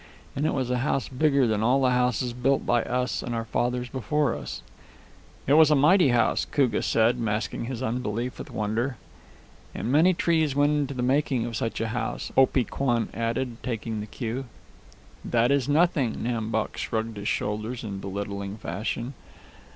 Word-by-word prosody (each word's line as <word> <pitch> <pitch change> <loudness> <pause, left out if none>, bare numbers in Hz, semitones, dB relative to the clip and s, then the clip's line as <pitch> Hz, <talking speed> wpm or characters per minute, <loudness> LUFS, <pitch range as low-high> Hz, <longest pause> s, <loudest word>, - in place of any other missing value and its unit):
And 145 +3 0
it - - 0
was 130 -2 -1
a 125 - +1
house 135 -1 0
bigger 140 0 +2
than 110 -2 +1
all 125 +5 +3
the 130 -2 +3
houses 125 -1 +1
built 135 +3 +1
by 120 -1 +3
us 125 +1 -1
and 120 - -4
our 115 0 -2
fathers 125 +3 -1
before 135 +2 0
us." - - -7 0.8
"It 140 - +3
was 155 0 +7
a 150 - +5
mighty 155 +4 +5
house," 120 -2 +2
Koogah 130 -7 +1
said, 115 +2 +2
masking 110 0 -2
his 130 0 -4
unbelief 120 0 -2
with - - -7
wonder. 110 +4 -2 0.8
"And 120 - -2
many 165 +6 +5
trees 160 -5 +1
went 145 +1 +3
into 145 -2 -1
the 125 - -2
making 130 -2 +1
of 120 -1 -5
such 115 +1 -2
a 115 0 -1
house," 120 +2 -3
Opee 130 -1 +4
Kwan 120 0 -1
added, 115 +1 -2
taking 115 -3 -3
the 105 - -5
cue. 120 +4 -4 0.8
"That 120 +2 +2
is 140 -1 +1
nothing." 150 -5 +2
Nam 115 -2 -2
Bok 110 -1 -2
shrugged 110 -1 -3
his 100 0 -5
shoulders 110 +4 -2
in 100 -3 -5
belittling 100 +1 -5
fashion. 115 +6 -4
125 Hz, 175 wpm, -26 LUFS, 115-135 Hz, 0.8 s, was